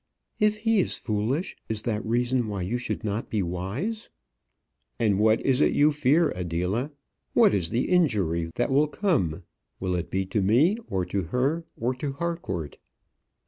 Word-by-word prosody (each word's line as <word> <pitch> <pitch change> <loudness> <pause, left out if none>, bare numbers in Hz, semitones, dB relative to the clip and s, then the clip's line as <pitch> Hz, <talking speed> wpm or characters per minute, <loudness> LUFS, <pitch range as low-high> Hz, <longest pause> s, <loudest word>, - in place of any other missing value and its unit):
"If 210 -1 +3
he 225 0 +2
is - - +1
foolish, 115 - -2
is 110 -1 -2
that 110 -3 -1
reason 120 +1 +1
why 100 -3 -3
you 115 +7 -2
should 120 - -4
not 105 +1 -3
be 105 -3 0
wise?" 100 - -4 0.9
"And 105 -4 +2
what 110 +1 +4
is 135 +1 +2
it - - +4
you 150 +1 +4
fear, 150 +3 +3
Adela? 90 - -2 0.5
What - - +6
is 90 -5 +1
the 120 - 0
injury 100 - +1
that 120 - 0
will 145 +3 +4
come? 130 - 0 0.4
Will 95 -1 -1
it 85 -1 -2
be 95 0 -1
to 100 +3 -1
me, 130 - +4
or 95 -2 -1
to 95 -1 -2
her, 140 - 0
or 120 +3 0
to 135 +2 -4
Harcourt?" 140 - -4
115 Hz, 170 wpm, -26 LUFS, 95-150 Hz, 0.9 s, What